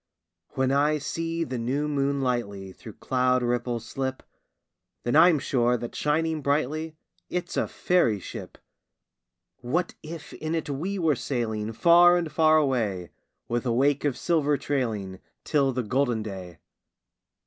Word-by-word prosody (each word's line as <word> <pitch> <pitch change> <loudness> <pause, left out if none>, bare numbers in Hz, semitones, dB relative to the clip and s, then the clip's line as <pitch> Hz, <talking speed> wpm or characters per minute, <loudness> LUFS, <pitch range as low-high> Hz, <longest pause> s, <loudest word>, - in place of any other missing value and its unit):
When 130 0 +1
I 145 +2 +3
see 165 +3 -3
the 125 -4 -4
new 135 +6 -1
moon 140 -1 0
lightly 100 -7 -2
Through 110 +3 -11
cloud 125 -1 +1
ripples 120 -1 -1
slip, 130 +1 -4 0.8
Then 120 - 0
I'm 165 +1 +7
sure 125 -3 +1
that 120 0 -6
shining 155 +1 0
brightly 155 +3 -1 0.3
It's 175 -1 -3
a - - +1
fairy 145 - +1
ship! - - -9 1.0
What 145 +8 -1
if 155 0 -9
in 155 +1 -3
it 160 -3 -3
we 180 +9 -3
were 160 -5 +2
sailing 115 -4 -2
Far 175 +8 +6
and 170 -3 -2
far 155 0 +4
away, 110 - 0 0.4
With 120 0 -1
a 125 - 0
wake 140 +4 +2
of 145 -4 0
silver 150 -4 +1
trailing, 110 -11 -2 0.2
Till 140 -3 +2
the 125 -1 -2
golden 120 -1 0
day? 95 -5 -8
135 Hz, 145 wpm, -26 LUFS, 120-155 Hz, 1.0 s, I'm